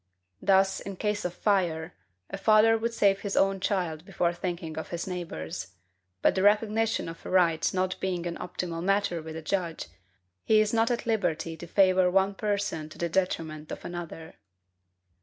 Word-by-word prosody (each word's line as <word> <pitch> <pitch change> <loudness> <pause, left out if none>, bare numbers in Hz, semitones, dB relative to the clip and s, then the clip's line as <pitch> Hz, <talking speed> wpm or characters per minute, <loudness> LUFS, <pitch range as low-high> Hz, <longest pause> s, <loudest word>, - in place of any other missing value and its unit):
Thus, 190 -1 +3
in 195 0 -7
case 210 +1 -2
of 180 - -2
fire, 175 -6 0 0.4
a - - -3
father 215 +2 +5
would 230 +1 -1
save 200 -3 +3
his 200 -1 -3
own 195 0 +3
child 175 -5 -1
before 175 -2 0
thinking 170 -2 -4
of 160 - -5
his 170 -1 -4
neighbor's; 165 - -5 0.5
but - - +5
the 190 - 0
recognition 215 +1 +2
of 165 0 -8
a - - -7
right 170 -4 +3
not 185 0 -1
being 180 -2 -2
an 170 -1 -4
optional 175 -1 -4
matter 195 -2 +1
with 160 0 -8
a 160 - -6
judge, 170 -1 -2 0.6
he 215 - +4
is 215 0 +2
not 225 +1 +3
at 240 -1 -1
liberty 165 -8 -1
to 175 - -9
favor 185 0 +4
one 195 +2 +2
person 200 -7 -2
to - - -13
the 170 - -1
detriment 160 -4 -2
of - - -7
another. 170 -2 -7
185 Hz, 175 wpm, -28 LUFS, 165-200 Hz, 0.6 s, father